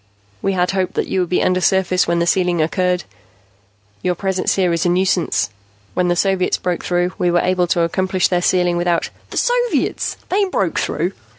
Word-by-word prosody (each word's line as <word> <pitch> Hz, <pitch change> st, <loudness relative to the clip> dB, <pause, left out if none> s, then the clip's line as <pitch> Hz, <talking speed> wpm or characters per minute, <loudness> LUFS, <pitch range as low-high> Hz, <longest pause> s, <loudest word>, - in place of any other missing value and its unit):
"We 195 Hz, -, 0 dB
had 180 Hz, -1 st, +1 dB
hoped 190 Hz, -1 st, -2 dB
that -, -, 0 dB
you 190 Hz, -, 0 dB
would 180 Hz, -2 st, 0 dB
be 180 Hz, -, +1 dB
undersurface 185 Hz, 0 st, +2 dB
when 170 Hz, 0 st, +1 dB
the 170 Hz, -, +1 dB
sealing 180 Hz, -1 st, +1 dB
occurred. 180 Hz, +2 st, 0 dB, 1.0 s
Your 180 Hz, -1 st, 0 dB
presence 190 Hz, 0 st, 0 dB
here 180 Hz, -3 st, +2 dB
is 170 Hz, +1 st, 0 dB
a 175 Hz, -, +2 dB
nuisance. 180 Hz, -, +1 dB, 0.4 s
When 180 Hz, -1 st, +1 dB
the 175 Hz, -, +2 dB
Soviets 190 Hz, 0 st, +1 dB
broke 180 Hz, -1 st, -3 dB
through, 175 Hz, 0 st, 0 dB
we 180 Hz, -, +2 dB
were 175 Hz, 0 st, +3 dB
able 180 Hz, -1 st, +1 dB
to 170 Hz, -, +1 dB
accomplish 185 Hz, +2 st, +1 dB
their 180 Hz, -1 st, 0 dB
sealing 180 Hz, -1 st, +2 dB
without 175 Hz, -1 st, 0 dB
" -, -, -32 dB
"The -, -, -7 dB
Soviets? -, -, 0 dB
They 400 Hz, +2 st, +2 dB
broke 375 Hz, -, -1 dB
through?" -, -, -1 dB
180 Hz, 195 wpm, -19 LUFS, 175-190 Hz, 1.0 s, were